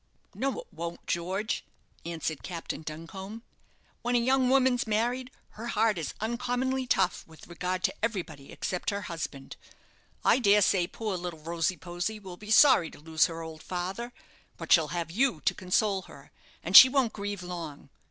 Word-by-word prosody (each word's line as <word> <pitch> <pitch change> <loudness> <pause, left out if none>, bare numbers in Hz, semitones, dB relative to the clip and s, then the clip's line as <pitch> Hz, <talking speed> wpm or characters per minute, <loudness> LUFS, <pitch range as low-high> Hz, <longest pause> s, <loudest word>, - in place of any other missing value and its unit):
"No 275 0 -2
it - - -19
won't, 170 -1 -6
George," 190 +6 -2 0.4
answered 160 -2 -3
Captain 170 -3 -5
Duncombe. 190 +8 -8 0.6
"When 245 +1 0
a - - +5
young 260 +1 +2
woman's 260 -2 +3
married, 240 +4 0 0.2
her 230 +2 -8
heart 225 -5 +1
is 155 - -5
uncommonly 250 +3 -1
tough 180 - +1
with 160 -1 -15
regard 180 +1 -3
to - - +1
everybody 175 -11 -4
except 180 - -3
her 200 0 -2
husband. 155 -7 -6 0.7
I - - +5
dare 205 -3 +5
say 180 -2 +2
poor 210 -1 -4
little 175 -2 -5
Rosy 170 +2 -1
posy 175 +6 -4
will 190 -4 -9
be 210 +3 -12
sorry 220 - +6
to - - -14
lose 160 0 +2
her 165 -1 -6
old 160 -1 -9
father; 190 +7 -4 0.5
but - - -7
she'll 160 -3 +6
have 170 0 -4
you 240 - +1
to - - +2
console 195 +1 +1
her, 140 -6 -15 0.3
and 180 +4 -2
she 260 - +13
won't 260 -4 +1
grieve 200 -2 -5
long. 165 -6 -7
185 Hz, 170 wpm, -29 LUFS, 170-230 Hz, 0.7 s, she